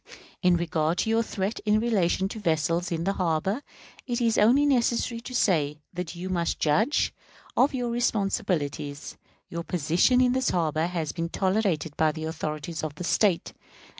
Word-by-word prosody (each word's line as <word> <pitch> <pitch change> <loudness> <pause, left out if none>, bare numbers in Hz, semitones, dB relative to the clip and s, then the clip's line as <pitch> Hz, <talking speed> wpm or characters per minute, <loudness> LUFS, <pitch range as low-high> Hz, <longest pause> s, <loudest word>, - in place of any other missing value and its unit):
In 180 -2 +4
regard 165 0 0
to 220 - 0
your 225 0 +3
threat 205 -1 -3
in 215 0 +3
relation 195 -5 +1
to 220 - -6
vessels 165 -1 0
in 165 -1 -1
the 195 +2 0
harbor, 185 - 0 0.5
it 240 -1 -1
is 230 -2 +2
only 250 +7 +5
necessary 235 -3 +1
to 255 +2 -7
say, 150 -10 +2 0.2
that 180 -1 -5
you 175 +2 -5
must 175 -2 -1
judge 210 - +2 0.4
of 270 +2 +3
your 245 -2 -1
responsibilities. 195 - -1 0.3
Your 170 - -4
position 175 - +2
in 250 -1 +4
this 260 0 +1
harbor 160 -1 0
has 165 -4 -3
been 170 -1 -3
tolerated 185 -6 0
by 155 -1 +3
the 155 - -6
authorities 155 0 -4
of 155 -2 -4
the 180 - -6
State. 185 0 +1
180 Hz, 165 wpm, -26 LUFS, 160-225 Hz, 0.5 s, only